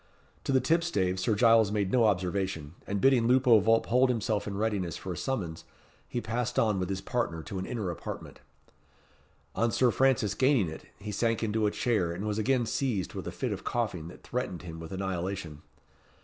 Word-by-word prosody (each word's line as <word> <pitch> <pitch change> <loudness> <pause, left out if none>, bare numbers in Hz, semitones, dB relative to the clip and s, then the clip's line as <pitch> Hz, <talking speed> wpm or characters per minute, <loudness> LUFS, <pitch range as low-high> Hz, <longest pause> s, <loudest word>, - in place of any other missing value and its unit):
To - - 0
the 130 - +5
tipstaves 125 - +1
Sir 105 +3 +1
Giles 115 -2 +5
made 100 -3 0
no 120 -3 +4
observation, 90 -5 -1
and 100 0 -1
bidding 125 -1 +4
Lupo 125 -2 +6
Vulp 115 +3 +3
hold 125 +2 +3
himself 110 -3 0
in 100 -1 -4
readiness 100 -6 -1
for 95 - -5
a - - -6
summons, 90 -9 -3 0.5
he 120 - -2
passed 115 +1 -2
on 105 -4 +2
with 90 0 -2
his 95 -1 -2
partner 100 -8 -2
to 95 - -5
an 95 - -4
inner 110 -8 -2
apartment. - - -7 1.2
On 115 - +2
Sir 125 0 +3
Francis 130 -7 +2
gaining 130 - +3
it, 80 - -9
he 105 +1 -6
sank 115 +2 0
into 110 0 +1
a - - +3
chair, 105 -7 0
and 95 +5 -5
was 105 0 -1
again 120 +2 +2
seized 115 -6 -1
with - - -6
a - - -3
fit - - -3
of - - -4
coughing 105 -9 -2
that 85 - -12
threatened 120 -8 -4
him 80 -2 -8
with 80 0 -8
annihilation. 95 -4 -4
105 Hz, 195 wpm, -29 LUFS, 95-120 Hz, 1.2 s, Lupo